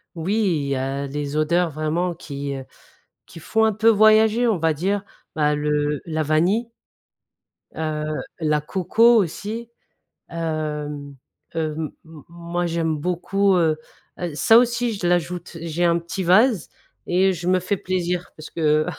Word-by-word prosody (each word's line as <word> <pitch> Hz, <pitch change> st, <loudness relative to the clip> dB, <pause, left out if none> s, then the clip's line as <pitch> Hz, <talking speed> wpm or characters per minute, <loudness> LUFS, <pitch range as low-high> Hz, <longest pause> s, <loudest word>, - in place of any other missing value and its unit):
Oui, 175 Hz, +5 st, -1 dB, 0.3 s
il -, -, -3 dB
y 140 Hz, -, 0 dB
a 135 Hz, +2 st, -2 dB
les 145 Hz, +1 st, -4 dB
odeurs 170 Hz, +3 st, +2 dB
vraiment 160 Hz, +4 st, -1 dB
qui, 140 Hz, -4 st, -5 dB
heu, 135 Hz, -1 st, -7 dB, 0.6 s
qui 165 Hz, -, -12 dB
font 220 Hz, +7 st, +1 dB
un 220 Hz, -, +3 dB
peu 220 Hz, +2 st, +2 dB
voyager 220 Hz, +2 st, +5 dB
on 220 Hz, -5 st, +2 dB
va 160 Hz, -1 st, +1 dB
dire, 195 Hz, +6 st, -1 dB, 0.3 s
bah 150 Hz, -1 st, +2 dB
le 150 Hz, -1 st, 0 dB
la 160 Hz, -1 st, -2 dB
vanille, 175 Hz, +10 st, +1 dB, 1.1 s
heu, 155 Hz, -1 st, -2 dB, 0.4 s
la 150 Hz, -2 st, +1 dB
coco 195 Hz, +9 st, +3 dB
aussi, 215 Hz, +4 st, -1 dB, 0.6 s
hem 150 Hz, -3 st, -4 dB, 0.4 s
hem, 155 Hz, -1 st, -2 dB
m 160 Hz, -3 st, -14 dB
moi 170 Hz, +1 st, -3 dB
j'aime 165 Hz, -2 st, -1 dB
beaucoup, 185 Hz, +4 st, +1 dB
heu 160 Hz, -3 st, +2 dB, 0.4 s
heu, 175 Hz, -4 st, -4 dB
ça 225 Hz, +9 st, +6 dB
aussi 240 Hz, -1 st, +1 dB
je 195 Hz, -3 st, -3 dB
l'ajoute, 175 Hz, 0 st, -1 dB
j'ai 165 Hz, +1 st, -2 dB
un 170 Hz, 0 st, +3 dB
petit 175 Hz, +3 st, -4 dB
vase 210 Hz, +3 st, +4 dB, 0.4 s
et 190 Hz, +2 st, +3 dB
je 175 Hz, -1 st, -6 dB
me 185 Hz, 0 st, +3 dB
fais 185 Hz, +3 st, -1 dB
plaisir 180 Hz, -1 st, -2 dB
parce 155 Hz, -, -10 dB
que, 155 Hz, -1 st, +2 dB
170 Hz, 150 wpm, -22 LUFS, 155-190 Hz, 1.1 s, ça